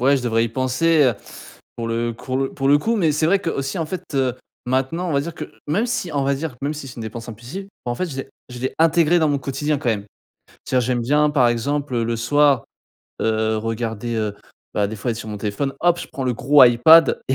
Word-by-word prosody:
ouais, 135 +3 +4
je 130 - -3
devrais 115 -1 +1
y - - -2
penser, 130 +6 +2
heu, 125 -3 +3 0.6
pour 115 -1 -4
le 115 +1 -1
cours 130 +3 -5
le 135 0 -1
pour 135 -1 -1
le 145 - +7
coup, 230 +10 0
mais 165 -7 +2
c'est 155 +2 0
vrai 195 +4 +4
qu'aussi, 150 -5 -3
en 160 - -1
fait, 185 +1 -5
heu, 130 -3 +1 0.3
maintenant, 130 +8 -1
on 160 - -1
va 140 - +2
dire 170 +2 -6
que, - - -6 0.2
même 205 +11 +1
si, 230 -9 -2
on 140 - 0
va 140 +1 +1
dire, 145 0 -4
même 145 +2 -2
si 145 -2 -7
c'est 130 - -10
une 115 - -6
dépense 115 +2 -7
impulsive, 125 - -8 0.2
en 120 - -1
fait, 185 +9 -2
je 140 - -7
l'ai - - -5 0.2
je 125 - -8
l'ai 130 - -2
intégré 165 +1 +4
dans 155 - +2
mon 145 -1 +1
quotidien, 145 +2 -2
quand 125 - -3
même. 105 -3 0 0.6
C'est - - -2
à - - +5
dire, 125 - -1
j'aime 125 -1 0
bien, 150 +5 +3
par 130 -5 +4
exemple, 135 +3 -1
heu, 115 - +1
le 115 +1 -1
soir, 140 +2 +3 0.6
heu, 110 0 +1
regarder, 115 +1 -3
heu, 105 -2 -1 0.4
bah, 100 -1 +2
des 110 - -6
fois, 115 +4 -2
être 115 - -3
sur 110 -1 -7
mon 105 - -5
téléphone, 105 +7 -2
hop, 175 0 +3
je - - -7
prends 135 - -4
le 125 - 0
gros 140 +4 +5
Ipad 125 +7 +6
et 130 - +2
135 Hz, 260 wpm, -21 LUFS, 115-150 Hz, 0.6 s, le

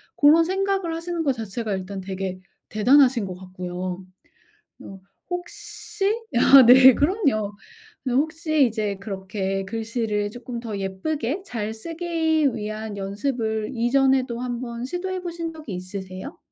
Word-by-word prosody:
고런 310 +3 +6
생각을 385 -2 -1
하시는 335 0 -3
거 280 - +2
자체가 220 -1 -4
일단 190 +1 -5
되게 190 -1 -4 0.3
대단하신 245 0 +4
것 185 -1 -6
같고요. 185 0 -6 0.8
어 195 -1 -10 0.3
혹시 355 +2 -5 0.3
아 270 +2 +8
네 255 +1 +9
그럼요. 280 - +1 0.5
근데 250 -2 -1
혹시 310 -1 +2
이제 210 -3 -2
그렇게 195 -1 -3
글씨를 220 -1 -2
쪼끔 240 0 -7
더 220 -4 -5
예쁘게 240 - -3
잘 220 - -4
쓰기 320 +1 0
위한 215 -1 -5
연습을 220 +2 -2
이전에도 255 0 +2
한번 240 -1 -4
시도해 370 +4 -3
보신 335 -2 -5
적이 305 -11 -8
있으세요? 185 - -7
235 Hz, 270 characters per minute, -24 LUFS, 200-310 Hz, 0.8 s, 네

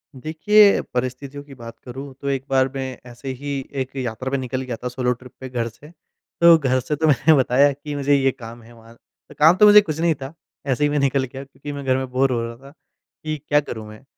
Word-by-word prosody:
देखिए, 200 +9 +4
परिस्थितियों 130 +3 -4
की 140 -1 -14
बात 115 -1 -11
करूँ, 135 +2 -8
तो 140 - -5
एक 135 -1 -2
बार 135 -1 +3
मैं 130 -1 -4
ऐसे 130 +3 -8
ही 140 -1 -3 0.2
एक 130 +1 -6
यात्रा 130 +1 -4
पे 140 - +1
निकल 130 0 -3
गया 125 -3 -4
था। - - -2
सोलो 125 0 -1
ट्रिप 125 +1 -14
पे 130 -1 -7
घर 120 -2 -2
से। 140 +7 -16 0.5
तो 170 -1 +8
घर 130 -3 +1
से 140 +4 -3
तो 160 +2 0
मैंने 150 +2 +4
बताया 135 +1 +4
कि 145 +1 -7
मुझे 140 0 +2
ये 135 -1 +2
काम 120 -2 -11
है 120 +1 -16
वहाँ। 115 0 -17 0.4
काम 160 +4 +6
तो 210 - +6
मुझे 210 0 +9
कुछ 160 -4 -5
नहीं 165 -2 +2
था 135 +3 -9 0.3
ऐसे 135 +2 0
ही 145 - +3
मैं 145 0 0
निकल 140 -1 +1
गया। 135 +1 -7
क्योंकि 135 +2 -10
मैं 140 -1 -6
घर 130 0 +2
में 130 0 -3
बोर 130 +1 +2
हो 120 -2 0
रहा 115 0 -6
था, 135 +2 -15 0.5
कि 155 0 -3
क्या 145 0 +4
करूँ 110 -7 -7
मैं। 110 +4 -13
135 Hz, 240 wpm, -21 LUFS, 125-145 Hz, 0.5 s, मुझे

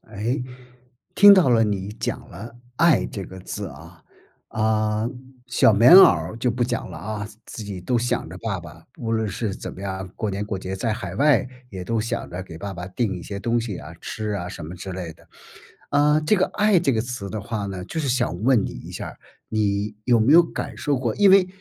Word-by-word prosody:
诶， 115 +6 -2 0.7
听 205 0 +9
到 180 -8 +4
了 115 -2 +4
你 100 -2 -2
讲 - - -4
了 115 +7 -10 0.2
爱 165 +2 +4
这 100 -7 -6
个 95 - -10
字 - - -5
啊。 - - -14 0.5
啊， 110 0 0 0.4
小 120 - +4
棉 115 +9 +7
袄 190 - +12
儿 - - +3
就 125 +1 +1
不 120 +1 0
讲 120 -1 -3
了 85 - -8
啊， 105 +4 -5 0.2
自 110 - -8
己 100 -2 -6
都 120 +7 0
想 120 +1 -1
着 - - -9
爸 - - -3
爸， - - -13
无 115 -1 -3
论 110 -1 0
是 100 0 -3
怎 - - -7
么 95 - -10
样， 95 -1 -4
过 110 - -2
年 100 +1 -3
过 105 -2 -4
节， 95 +1 -5
在 110 +3 -1
海 115 - -6
外 140 -6 +4 0.2
也 95 -5 -7
都 115 +3 -1
想 115 +2 -3
着 90 +2 -5
给 90 -3 -10
爸 100 +4 -6
爸 90 -1 -7
定 100 +1 -2
一 85 - -8
些 100 - -6
东 115 +3 0
西 110 -5 -4
啊， 80 - -9
吃 110 -1 -4
啊 90 -4 -3
什 85 -4 -8
么 85 +3 -7
之 95 +2 -7
类 90 -3 -5
的。 - - -23 0.6
啊， 150 +1 +4
这 155 +7 +2
个 185 - +2
“爱” 210 -3 +4
这 150 -5 +2
个 110 - +1
词 120 -4 -5
的 110 - -4
话 105 0 -4
呢， 95 -2 -5
就 160 - -4
是 145 - -2
想 120 -8 -1
问 120 -4 +4
你 - - -5
一 - - -9
下 - - -6
儿， - - -10 0.3
你， 105 -1 -1
有 120 -2 +4
没 115 +6 +4
有 170 +2 +9
感 165 - -6
受 145 -3 0
过？ 120 -4 -1
因 200 -2 +5
为 190 -1 +6
110 Hz, 245 characters per minute, -23 LUFS, 95-125 Hz, 0.7 s, 袄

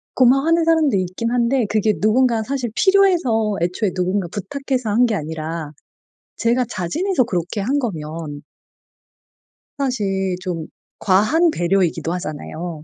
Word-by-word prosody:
고마워하는 275 +7 +4
사람도 315 -8 +3
있긴 185 +6 -2
한데 245 0 +2
그게 215 0 +2
누군가 230 +1 +2
사실 260 0 -3
필요해서 345 - +3
애초에 180 +3 0
누군가 185 0 0
부탁해서 260 +2 -3
한 235 +4 +4
게 225 -3 0
아니라 160 -1 -5 0.6
제가 240 +2 +1
자진해서 255 - 0
그렇게 180 -1 -3
한 270 +8 0
거면 155 - -5 1.3
사실 195 -9 -1
좀 170 -4 -4 0.3
과한 250 - +3
배려이기도 170 - 0
하잖아요. 160 -1 -6
215 Hz, 300 characters per minute, -20 LUFS, 175-255 Hz, 1.3 s, 고마워하는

